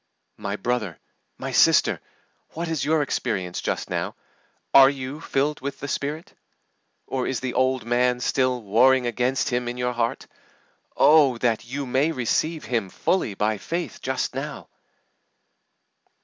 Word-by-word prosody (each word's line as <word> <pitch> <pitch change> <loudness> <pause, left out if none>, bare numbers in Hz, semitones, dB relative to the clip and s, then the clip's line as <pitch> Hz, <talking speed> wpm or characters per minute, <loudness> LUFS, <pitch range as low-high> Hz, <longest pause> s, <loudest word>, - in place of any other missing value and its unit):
My 100 -1 -3
brother, 110 -6 -2 0.4
my - - -5
sister, - - +4 0.5
what 170 +2 -4
is 160 -3 -2
your 155 0 +2
experience 95 -10 -2
just - - -2
now? - - -3 0.6
Are 135 -1 +9
you 135 +2 -5
filled 145 +2 -1
with 140 +1 -5
the 145 - -5
Spirit? 150 +4 -4 0.7
Or 130 -1 -2
is 130 - -1
the 130 -2 -3
old 130 -1 +1
man 125 +1 +2
still 125 -1 0
warring 125 +5 +4
against 125 +4 0
Him 125 -1 -1
in 120 +1 -4
your 125 0 -1
heart? 115 -1 -2 0.7
Oh, 145 -5 +5
that 115 -2 0
you 135 +3 -4
may 135 +5 +1
receive 155 +4 -1
Him 115 -6 -1
fully 115 - -1
by 105 +1 0
faith 170 - -4
just 130 0 -2
now! 140 +3 -6
130 Hz, 145 wpm, -24 LUFS, 120-140 Hz, 0.7 s, Are